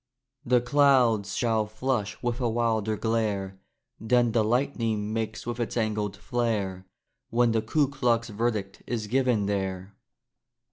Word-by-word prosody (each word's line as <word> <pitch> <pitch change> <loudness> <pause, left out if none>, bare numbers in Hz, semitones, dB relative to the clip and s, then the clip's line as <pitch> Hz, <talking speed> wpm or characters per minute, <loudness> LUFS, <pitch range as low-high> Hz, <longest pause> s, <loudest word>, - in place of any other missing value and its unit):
The 125 0 +3
clouds 125 -6 +3
shall 110 -3 +1
flush 110 -1 -2
with 120 +1 -1
a 120 - +1
wilder 110 -2 0
glare 105 -4 -1 0.4
Than 120 +1 +2
the 110 -1 +2
lightning 115 -3 0
makes 110 -1 -3
with 120 0 -4
its 120 0 -2
angled 105 -3 -1
flare, 100 -5 -2 0.4
When 120 0 +3
the 110 -1 +1
Ku 140 +6 +1
Klux 120 -4 0
verdict 105 -2 -2
is 115 -3 -2
given 120 -2 +1
there. 95 -1 -3
115 Hz, 135 wpm, -27 LUFS, 105-120 Hz, 0.4 s, The